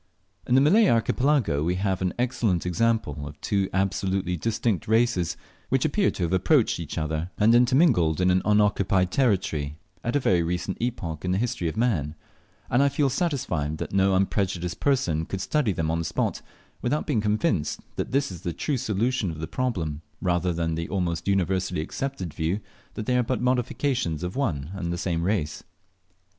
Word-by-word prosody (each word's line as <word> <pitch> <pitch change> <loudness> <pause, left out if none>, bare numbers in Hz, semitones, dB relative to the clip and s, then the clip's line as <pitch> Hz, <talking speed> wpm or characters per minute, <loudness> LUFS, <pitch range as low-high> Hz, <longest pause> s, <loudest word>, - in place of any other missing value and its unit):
In 125 - +3
the 135 - +6
Malay 200 +10 +5
Archipelago 120 - +2
we 90 +3 0
have 95 0 -1
an 90 -1 +1
excellent 120 -8 0
example 90 -7 0
of 75 0 -11
two 100 -2 0
absolutely 95 -1 0
distinct 110 0 -1
races, 110 -6 +2 0.3
which 135 +2 +2
appear 190 +6 +2
to 90 - -3
have 85 +1 0
approached 110 - +3
each 80 -1 -6
other, 80 +2 -2
and 110 +2 +5
intermingled 120 - +4
in 90 0 +3
an 90 +1 +3
unoccupied 100 -3 +2
territory 90 - 0 0.3
at 120 - -1
a - - +4
very 90 -9 +2
recent 90 +3 -2
epoch 85 -10 -3
in 90 0 0
the - - +1
history 110 -6 -1
of 80 - -4
man; 85 - 0 0.5
and 125 - +2
I 140 - +4
feel 140 -1 +1
satisfied 90 - -1
that - - -5
no 95 0 +3
unprejudiced 95 -2 -1
person 125 - +1
could 95 - -4
study 135 +3 +1
them 80 -3 -1
on 80 - 0
the 80 - -2
spot - - -1 0.4
without 145 +5 0
being 130 -9 +1
convinced 105 - 0
that - - -3
this 140 -4 +1
is 85 -2 -8
the 85 -3 -3
true 145 - -1
solution 115 0 0
of 80 - -6
the 80 - -4
problem, 85 -11 -2 0.2
rather 90 0 +1
than 85 -1 -1
the 85 +1 -3
almost 90 -3 -2
universally 95 -2 +1
accepted 95 - -4
view 80 +6 -1 0.4
that 110 - -4
they 125 +1 +2
are - - +4
but 125 +1 -1
modifications 125 - 0
of 90 +1 -4
one 80 - -1
and 90 -3 -3
the 85 - -2
same 85 -1 -1
race. 85 -5 -1
95 Hz, 185 wpm, -25 LUFS, 85-120 Hz, 0.5 s, the